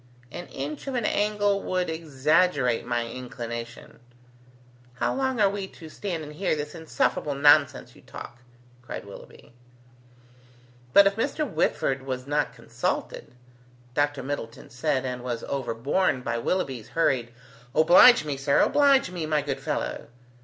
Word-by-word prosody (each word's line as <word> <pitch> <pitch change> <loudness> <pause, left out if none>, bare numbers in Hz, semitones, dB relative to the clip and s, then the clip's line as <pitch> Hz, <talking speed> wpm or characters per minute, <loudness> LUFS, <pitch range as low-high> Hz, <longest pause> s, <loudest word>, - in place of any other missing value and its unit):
"An 175 0 -7
inch 145 - -6
of 270 - -3
an 235 -3 -1
angle 205 -1 +1
would 185 -1 -1
exaggerate 155 -4 +1
my 120 -1 0
inclination." 120 -1 -7 1.0
"How - - 0
long 260 -2 -1
are 205 - +5
we 195 -1 -3
to 160 -4 -13
stand 170 -1 -4
and 150 0 -9
hear 185 +1 0
this 150 0 -5
insufferable 160 -3 -1
nonsense 145 +1 +4
you - - -17
talk?" 120 - -10 0.4
cried 125 - -7
Willoughby. 100 +3 -13 1.4
"But 200 +7 +8
if 195 +1 +2
Mr. 285 +5 -1
Whitford 135 - 0
was 130 -1 -5
not 145 +1 0
consulted.. - - -4 0.3
." 125 0 -29
Dr. 145 -1 0
Middleton 130 -4 -6
said, 135 +1 -1
and 125 -1 -4
was 120 -2 -4
overborne 135 +4 -1
by 120 -1 -2
Willoughby's 130 - -2
hurried, 125 -7 +1 0.4
"Oblige 175 +5 +7
me, 145 -2 -3
sir. 140 +1 +2
Oblige 280 -8 +4
me, 170 -4 -4
my 150 -2 +1
good 140 -2 -3
fellow!" 135 - -3
145 Hz, 145 wpm, -26 LUFS, 125-185 Hz, 1.4 s, But